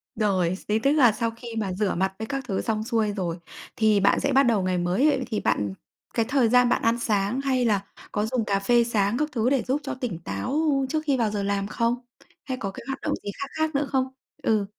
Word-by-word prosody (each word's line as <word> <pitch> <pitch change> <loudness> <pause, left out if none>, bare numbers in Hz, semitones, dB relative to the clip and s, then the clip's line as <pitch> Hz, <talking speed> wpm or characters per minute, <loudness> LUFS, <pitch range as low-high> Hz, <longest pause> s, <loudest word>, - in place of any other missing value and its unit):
Rồi, 185 -5 +1
xế 210 +3 -1
tức 275 +5 +2
là 270 -7 +6
sau 230 +1 -1
khi 230 +2 -11
mà 195 -4 -1
rửa 200 0 0
mặt 190 +2 0
với 220 - -3
các 275 -1 -3
thứ 195 -4 -1
xong 215 -1 -1
xuôi 225 -3 0
rồi, 175 -3 -2 0.4
thì 215 -2 +3
bạn 200 - +3
sẽ - - 0
bắt 275 +1 +6
đầu 225 -5 +2
ngày 185 -1 0
mới. 255 +11 +2
Thì 215 -3 -2
bạn 100 -2 0 0.4
cái 230 - +1
thời 260 -5 +3
gian 250 0 +5
bạn - - +2
ăn 230 +1 +2
sáng 210 +3 0
hay 260 -3 +1
là 205 -3 +2 0.3
có 210 0 0
dùng 230 -1 -1
cà 200 -1 +1
phê 240 +4 +4
sáng 215 -1 +1
các 300 0 0
thứ 235 +1 +1
để 270 -3 +2
giúp 280 +3 0
cho 275 -1 -4
tỉnh 245 -10 -4
táo 165 - -2 0.3
trước 310 -1 0
khi 275 -3 +2
vào 225 -3 +1
giờ 205 -1 -2
làm 200 0 -1
không? 230 +2 0 0.5
Hay 260 -1 -4
có 195 -2 -2
cái - - -10
hoạt 270 - -4
động - - -1
gì 200 - -3
khác 275 - -4
khác 315 -1 0
nữa 280 0 +1
không? 265 -1 +2 0.4
Ừ. 215 -3 +2
225 Hz, 250 wpm, -25 LUFS, 200-255 Hz, 0.5 s, là